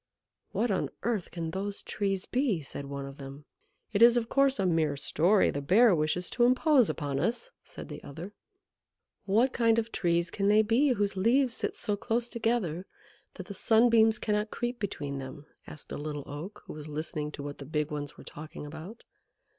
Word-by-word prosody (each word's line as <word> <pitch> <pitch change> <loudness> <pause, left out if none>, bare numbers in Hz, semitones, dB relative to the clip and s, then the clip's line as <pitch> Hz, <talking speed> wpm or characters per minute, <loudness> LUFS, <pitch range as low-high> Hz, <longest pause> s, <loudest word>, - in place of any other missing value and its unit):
"What 215 +3 0
on 190 - 0
earth 225 -6 -1
can 165 -2 -4
those 200 +3 -4
Trees 195 -2 -2
be?" 245 - 0
said 140 +1 -6
one 140 0 -5
of 140 +1 -10
them. 140 +1 -9 0.5
"It 205 - +1
is, 235 +1 +8
of 230 -1 -1
course, 275 -1 +3
a 195 - 0
mere 160 -5 +1
story; 175 +8 +3
the 145 - -3
Bear 205 - +5
wishes 160 +3 0
to 240 - +2
impose 255 0 +4
upon 145 -3 -2
us," 240 - -1
said - - -10
the - - -8
other. 170 +8 -8 0.9
"What 230 +7 +3
kind 230 -1 +3
of 230 0 -1
Trees 170 -1 0
can 200 -1 0
they 210 +1 +5
be 250 +6 +3
whose 205 -3 -1
leaves 240 +6 +3
sit - - -2
so 210 -3 -1
close 230 +4 -1
together 220 -8 -1 0.5
that 185 - -7
the 200 - -7
sunbeams 225 +1 +4
cannot 210 0 -1
creep 240 +2 -3
between 145 -9 -4
them?" 135 +2 -8 0.2
asked 150 - -9
a - - -4
Little 145 -1 -4
Oak, 165 +9 -8
who - - -8
was 150 0 -8
listening 150 0 -4
to 145 - -7
what 145 0 -7
the 140 - -7
big 150 0 -1
ones 150 0 -5
were - - -12
talking 150 0 -9
about. 160 +9 -9
195 Hz, 195 wpm, -29 LUFS, 150-230 Hz, 0.9 s, is